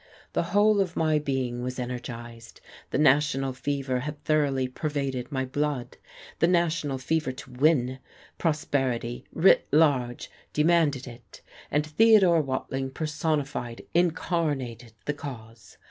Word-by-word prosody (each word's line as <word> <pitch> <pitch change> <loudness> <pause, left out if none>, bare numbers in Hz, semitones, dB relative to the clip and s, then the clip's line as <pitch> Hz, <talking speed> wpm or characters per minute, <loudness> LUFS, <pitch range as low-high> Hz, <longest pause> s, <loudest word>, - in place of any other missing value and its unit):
The - - +2 0.2
whole 210 0 +5
of 180 -3 -2
my 155 -1 +2
being 130 -4 -2
was 125 +1 -4
energized. 120 -2 -7 0.3
The - - -1
national 140 -2 +3
fever 130 0 -2
had 145 +3 -5
thoroughly 140 -4 +1
pervaded 135 -1 -3
my 130 -2 -1
blood 145 -1 -2 0.4
the 165 - +4
national 165 -5 +1
fever 155 +1 -1
to 130 0 -11
win. 130 -1 +2 0.4
Prosperity 135 -7 -1
writ 170 +4 +4
large 135 -5 +2 0.2
demanded 150 -4 +2
it, 120 -1 -13 0.3
and 150 +1 +1
Theodore 185 0 +5
Watling 135 -1 -3
personified, 145 -5 -2
incarnated 150 -9 -1
the 145 - 0
cause. 115 - -10
140 Hz, 120 wpm, -27 LUFS, 125-155 Hz, 0.4 s, whole